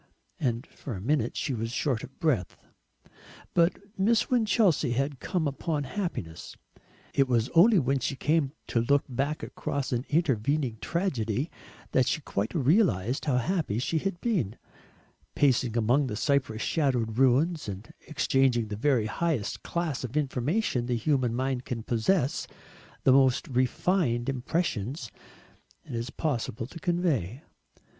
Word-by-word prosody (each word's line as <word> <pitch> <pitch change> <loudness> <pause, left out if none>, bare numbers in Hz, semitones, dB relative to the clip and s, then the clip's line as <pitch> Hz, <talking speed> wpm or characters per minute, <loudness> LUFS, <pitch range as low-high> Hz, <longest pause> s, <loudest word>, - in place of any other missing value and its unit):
And 125 -3 -1
for 130 -7 -8
a - - -6
minute 140 +9 0
she 145 - -1
was 115 -1 -3
short 125 -2 -1
of 135 - -11
breath. 130 - 0 1.0
But 170 +1 +3 0.2
Miss 220 +5 +2
Winchelsea 210 - +3
had 135 +2 -1
come 175 -6 -1
upon 145 +1 -2
happiness. 135 - -5 0.6
It 135 -1 +3
was 120 -2 +1
only 200 +6 +6
when 135 -3 +2
she 130 +2 -2
came 150 0 +1 0.2
to 115 - +2
look 140 +4 +3
back 140 +4 -2
across 140 -2 -3
an 125 +1 -1
intervening 140 -5 +1
tragedy 140 - -1 0.4
that 130 -1 +3
she 145 - +1
quite 105 - -3
realised 135 - +2
how 135 -5 +2
happy 150 - 0
she 155 +6 0
had 195 0 -3
been, 165 - 0 0.8
pacing 125 -4 +2
among 125 +5 +3
the 105 - -3
cypress 130 -2 0
shadowed 125 -7 0
ruins, 140 +3 +3
and 100 +3 -8
exchanging 135 -6 +2
the 105 - -3
very 125 0 +2
highest 135 0 -1
class 170 -7 -2
of 125 +3 -4
information 140 - 0
the 125 - 0
human 125 -1 +1
mind 130 0 -1
can 115 -3 -4
possess, 130 - +1 0.6
the 130 - +5
most 135 +2 +4
refined 130 0 +1
impressions 130 - -2 0.7
it - - -9
is 115 +2 -3
possible 120 -7 -2
to 165 +7 -10
convey. 155 - -1
135 Hz, 140 wpm, -28 LUFS, 120-160 Hz, 1.0 s, only